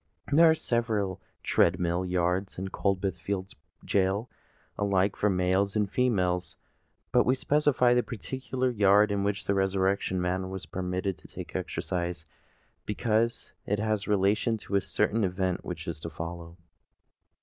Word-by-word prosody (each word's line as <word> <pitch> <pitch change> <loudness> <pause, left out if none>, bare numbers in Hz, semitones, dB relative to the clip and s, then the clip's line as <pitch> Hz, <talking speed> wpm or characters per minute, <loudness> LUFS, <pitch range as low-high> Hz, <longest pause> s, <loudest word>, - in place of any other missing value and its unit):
There 165 +3 +7
are 160 - +5
several 110 - -1 0.2
tread 85 +2 +3
mill 85 +1 0
yards 90 +1 -1
in 95 +1 -4
Coldbath 95 -2 -1
Fields' 95 +2 -4 0.3
gaol, 100 +4 +1 0.4
alike 100 -1 +1
for 105 - +1
males 95 +2 +1
and 105 -1 +2
females; 90 -7 0 0.6
but 125 - +5
we 130 - +2
specify 140 -3 +3
the 125 - +4
particular 130 +2 -3
yard 105 -1 +4
in 100 -1 0
which 100 0 -1
the 100 - +1
Resurrection 95 -1 +1
Man 95 +1 -1
was 95 -1 -6
permitted 90 +1 -3
to - - -15
take - - -9
exercise, 85 -2 -3 0.6
because 115 +2 0 0.2
it 105 - +1
has 110 -1 -1
relation 105 +3 +2
to 105 - -5
a 100 - +4
certain 105 +3 0
event 95 -1 -1
which 85 -2 -6
is 80 -2 -3
to 80 - -6
follow. 85 +1 -7
95 Hz, 150 wpm, -28 LUFS, 90-105 Hz, 0.6 s, There